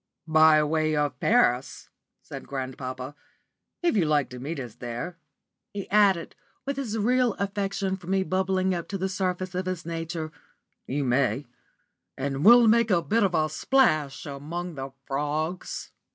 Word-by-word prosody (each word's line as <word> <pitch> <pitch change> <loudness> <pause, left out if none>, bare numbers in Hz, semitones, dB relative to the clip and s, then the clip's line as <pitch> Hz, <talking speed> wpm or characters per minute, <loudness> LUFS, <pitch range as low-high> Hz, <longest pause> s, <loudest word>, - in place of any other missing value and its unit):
"By 155 -1 +6
way 155 0 +1
of 145 -4 -1
Paris," 130 - +1 0.3
said - - -9
grandpapa. 130 0 -5 0.7
"If 345 - +2
you 185 -6 +3
like 150 -4 +1
to 125 - -8
meet 145 +4 -4
us 120 -4 -7
there," 125 +11 -6 0.6
he 200 - -4
added, 195 -4 +3 0.3
with 275 0 -3
his 230 -6 -3
real 245 +1 +2
affection 195 -1 -2
for 180 -3 -14
me 190 0 +1
bubbling 190 0 0
up 170 -2 -4
to 195 - -3
the 190 +1 -1
surface 185 -1 -2
of 185 +1 -3
his 185 -3 -3
nature, 165 -1 -4 0.6
"you 145 +2 -1
may; 130 0 +1 0.7
and 135 +1 -2
we'll 235 +3 +8
make 230 +1 +4
a 175 -4 +3
bit 225 +2 +1
of 190 -4 +2
a 155 -1 +2
splash 155 - +1
among 160 +5 -5
the 135 -2 -6 0.2
frogs." 150 +5 -3
170 Hz, 155 wpm, -26 LUFS, 145-195 Hz, 0.7 s, we'll